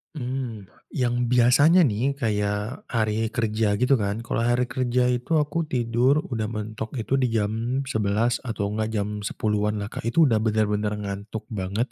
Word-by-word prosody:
Mmm, 125 -5 -4 0.3
yang 120 -1 +1
biasanya 125 +9 +5
nih 130 +3 +1
kayak 105 +1 -2
hari 110 -1 0
kerja 110 -2 0
gitu 125 +3 +3
kan, 105 +3 -2
kalau 115 - -2
hari 120 +1 +2
kerja 125 0 0
itu 125 +6 -1
aku 155 +2 0
tidur 125 +4 +2
udah 110 -2 -1
mentok 110 +2 -5
itu 130 +3 0
di 130 - +2
jam 115 +4 -1
11.00 110 0 0
atau 110 -5 -3
enggak 110 +1 -1
jam 105 0 -2
10.00-an 105 0 -1
lah 105 0 -4
Kak, 115 - -5
itu 160 +8 +4
udah 115 -7 +3
bener-bener 105 -1 0
ngantuk 105 +1 -5
banget 100 +4 -2
115 Hz, 160 wpm, -25 LUFS, 105-125 Hz, 0.3 s, biasanya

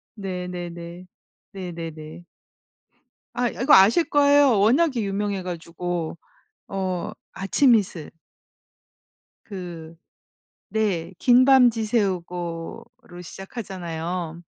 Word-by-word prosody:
네네네. 180 -3 -6 0.5
네네네. 165 -3 -7 1.1
아 245 -1 0
이 - - -9
이거 270 +4 +4
아실 210 - +7
거예요. 285 -5 +5
워낙에 255 +5 +3
유명해 200 -1 -2
가지고. 170 -1 -4 0.5
어 185 -2 -3 0.2
아침 235 +6 +3
이슬. 180 -7 -1 1.3
그 175 -5 -8 0.7
네. 190 -6 -1
"긴 250 0 +5
밤 260 -2 +6
지새우고."로 180 -6 -4
시작하잖아요. 175 -4 -6
185 Hz, 180 characters per minute, -24 LUFS, 170-220 Hz, 1.3 s, 아실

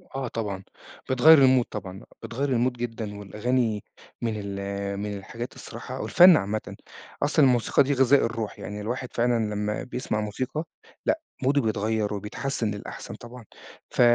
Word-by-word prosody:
آه 135 -1 -2
طبعًا، 105 -5 -4 0.5
بتغيّر 130 +5 +8
الmood 130 -1 +5
طبعًا 95 -2 -7 0.2
بتغيّر 135 +5 -2
الMood 125 +2 +2
جدًا 115 -4 -5
والأغاني، 110 +1 -1 0.4
من 115 - 0
ال 100 0 -4
من 105 0 -3
الحاجات 120 +5 -7
الصراحة 125 +3 -7
والفن 180 -2 +7
عامةً، 105 -1 -3 0.5
أصلًا 150 0 +4
الموسيقى 125 +1 +4
دي 140 +1 0
غذاء 135 +1 +4
الروح، 115 -2 -4
يعني 105 0 -6
الواحد 125 +4 -3
فعلًا 115 -3 +1
لمّا 105 +1 -2
بيسمع 125 -4 -3
موسيقى، 130 +8 -3 0.4
لأ 320 - +2 0.2
موده 140 +2 +3
بيتغيّر 110 -1 0
وبيتحسِّن 105 +3 -3
للأحسن 100 -1 -7
طبعًا، 120 0 -11 0.5
ف - - +1
115 Hz, 145 wpm, -26 LUFS, 105-130 Hz, 0.5 s, بتغيّر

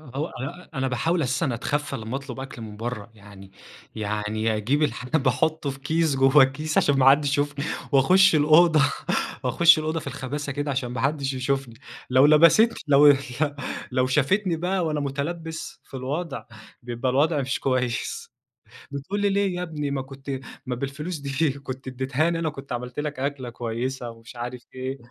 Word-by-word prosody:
هو 145 - -1
آآ 155 +8 -8
أنا 135 0 -1
باحاول 165 +7 0
أساسًا 130 -1 0
أتخفّى 145 +5 -2
لما 110 +3 -5
أطلب 135 -2 -8
أكل 130 -3 -8
من 105 -2 -8
برّه 115 -1 -5
يعني 100 -2 -14 0.4
يعني 105 +1 -1
أجيب 140 +8 +1
الحاجة، 145 +1 0
باحطه 155 +1 0
في 135 0 -6
كيس 160 +1 +1
جوّه 135 +2 +4
الكيس 150 +4 -1
عشان 145 -1 +3
ما 130 +1 +7
حدش 145 +1 +4
يشوفني 145 +1 -1 0.3
وأخش 180 +6 +5
الأوضة 155 +2 +5 0.6
وأخش 165 -2 +5
الأوضة 155 +1 -2
في 140 - -9
الخباثة 140 +2 -4
كده 145 +1 -2
عشان 130 -2 -2
ما 125 - -3
حدش 140 -1 0
يشوفني، 130 -1 -2 0.4
لو 130 +2 +6
لبست 170 +10 +6
لو 145 +1 +7
ل 140 -2 +7 0.7
لو 130 0 +2
شافتني 165 +7 +2
بقى 180 +1 0
وأنا 150 -1 -1
مُتلبَس 160 +4 -4
في - - -26
الوضع، 140 +4 -4 0.4
بيبقى 120 +1 -2
الوضع 145 +2 +2
مش 130 +1 -2
كويس. 125 -2 -2 0.6
بتقول 145 +9 -4
لي 205 0 +2
ليه 195 -2 +1
يا 180 - -3
ابني، 150 -4 -4
ما 135 -1 -1
كنت 135 +1 -11 0.4
ما 125 - -2
بالفلوس 140 +7 -4
دي 140 +2 0
كنت 130 -1 -7
اديتهاني 135 +6 0
أنا 160 -1 0
كنت 140 -2 -10
عملت 125 +3 -5
لك 150 -3 -4
أكلة 135 -3 -3
كويسة 120 +1 -4
ومش 115 +1 -13
عارف 120 +1 -6
إيه، 130 +1 -4
140 Hz, 170 wpm, -25 LUFS, 130-155 Hz, 0.7 s, ما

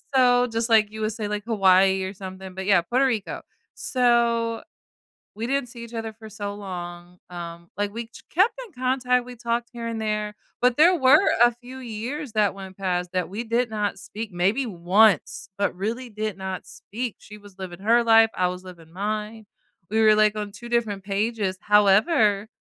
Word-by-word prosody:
so 245 -1 +5
just 230 -1 -2
like 215 -2 +4
you 220 0 -7
would 215 0 -1
say, 215 -1 -4
like, 210 0 -3
Hawaii, 190 -3 +4
or 190 - -4
something, 190 -1 -9
but, 190 0 -5
yeah, 195 -4 +5
Puerto 255 +9 +1
Rico. 225 -6 -2 0.3
So, 235 -2 +1 0.7
we 225 +2 -4
didn't 275 0 -1
see 235 0 -9
each 235 - -12
other 225 -1 -5
for 220 0 -12
so 205 -1 -5
long. 175 -3 -8
Um, 170 -1 -8
like, 205 0 -2
we 230 +1 -6 0.3
kept 385 +7 +4
in 420 - -20
contact. 250 -1 0
We 250 0 -9
talked 235 0 -2
here 235 -1 -6
and 230 -1 -3
there, 210 -1 -2 0.3
but 250 +2 +3
there 350 +4 +6
were 265 +2 +6 0.2
a 240 - +4
few 250 +2 -11
years 245 +4 -5
that 210 -3 +2
went 190 -1 -10
past 180 -2 -1
that 180 -1 -1
we 210 +5 -5
did 235 +2 0
not 210 -2 -2
speak 215 +2 -7
maybe 195 +10 +1
once 195 - +2
but 200 - 0
really 230 +7 -3
did 215 -3 -4
not 190 -1 -5
speak. 235 +1 -6
She 210 - -12
was 205 -2 -16
living 185 -2 -7
her 230 +4 +4
life. 225 -1 +6
I 180 - +1
was 180 +1 -7
living 170 -3 -13
mine. 215 +3 -4 0.5
We 220 - +1
were, 215 -1 +6
like, 215 0 +4
on 210 -1 -4
two 235 +4 -10
different 220 -5 -1
pages. 200 -1 -1
However, 210 - +4
215 Hz, 190 wpm, -24 LUFS, 195-235 Hz, 0.7 s, there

